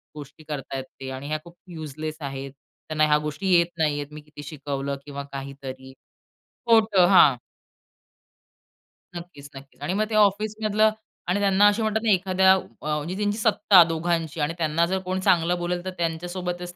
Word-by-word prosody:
गोष्टी 145 +1 -11
करताहेत 135 -2 -4 0.2
ते 130 - -5
आणि 135 +2 -7
ह्या 155 0 -2
खूप 170 0 -15
युजलेस 155 -1 -6
आहेत. 135 -1 -6 0.4
त्यांना 155 0 +2
ह्या 150 0 +4
गोष्टी 150 +6 -4
येत 170 0 +3
नाही 155 -2 +2
आहेत. 145 - -5
मी 150 - -9
किती 145 0 -12
शिकवलं 140 -1 -4
किंवा 140 -1 -6
काहीतरी 135 -1 -8 0.8
खोटं. 215 -6 +5
हां. 150 -9 +6 1.8
नक्कीच, 160 -5 -10
नक्कीच. 135 +1 -14
आणि 170 +6 -2
मग 215 +2 +1
ते 215 - -2
ऑफिसमधलं 215 +1 +2 0.4
आणि 195 +3 +1
त्यांना 200 0 +4
असे 205 +2 +2
म्हणतात 220 0 0
ना 225 - +1
एखाद्या 190 0 +3
अ, - - +2 0.2
म्हणजे 150 +4 -3
त्यांची 205 0 -1
सत्ता 205 -4 +5
दोघांची 165 -1 -2
आणि 150 +3 0
त्यांना 165 +1 +1
जर 190 +2 -1
कोण 185 +1 -2
चांगलं 175 -1 +2
बोलेल 175 0 -2
तर - - -2
त्यांच्यासोबतच 175 +1 -4
170 Hz, 165 wpm, -24 LUFS, 145-190 Hz, 1.8 s, हां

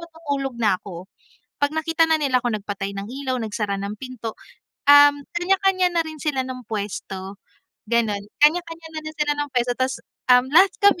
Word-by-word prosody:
matutulog 285 -6 -4
na 210 -5 +1
'ko, 180 -2 -9 0.5
'pag 285 +1 0
nakita 325 +1 +1
na 320 -1 +2
nila 255 -4 +1
'kong 215 -3 -1
nagpatay 200 -1 -5
ng 195 +1 -6 0.2
ilaw, 255 -2 -1
nagsara 205 -2 -3
ng 200 +1 -5
pinto, 240 -3 -7 0.5
um, 290 0 +9 0.2
kanya-kanya 370 0 +2
na 335 - +3
rin 315 -1 -7
sila 285 -3 -1
ng 255 -2 -7
pwesto, 200 -2 -5 0.5
ganon. 225 -4 +1 0.2
Kanya-kanya 330 0 +1
na 315 - -5
rin 310 0 -9
sila 300 -1 +1
ng 290 - -2
pwesto 245 -2 0
tas, 260 +2 -1 0.3
um, 250 +2 +5
lahat 375 +4 +7 0.2
kami, 405 -3 +5
260 Hz, 175 wpm, -22 LUFS, 215-315 Hz, 0.5 s, um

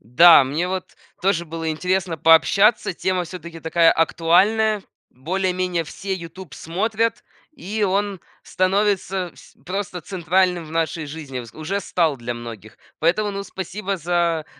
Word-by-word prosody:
Да, 145 - +7
мне 155 +7 -2
вот 185 -1 -5 0.3
тоже 180 -3 +1
было 165 0 -4
интересно 180 +1 -1
пообщаться. 195 +8 +4
Тема 180 0 -1
всё-таки 170 -1 -9
такая 165 +1 +4
актуальная, 200 +7 +2 0.3
более-менее 180 +3 -1
все 190 +5 -5
"Ютуб" 170 -2 -9
смотрят, 220 +7 -1 0.3
и 215 - -4
он 200 0 -1 0.2
становится 190 -1 0
вс - - -17
просто 185 -1 -4
центральным 180 0 +1
в - - -12
нашей 165 -1 -2
жизни, 145 -4 -6
вс 115 -2 -11
уже 185 +6 -3
стал 165 -7 0
для 120 0 -4
многих. 115 -3 -10 0.2
Поэтому, 195 +6 +1
ну, 200 0 -4
спасибо 195 +1 -4
за 170 -1 0
175 Hz, 135 wpm, -22 LUFS, 160-195 Hz, 0.3 s, Да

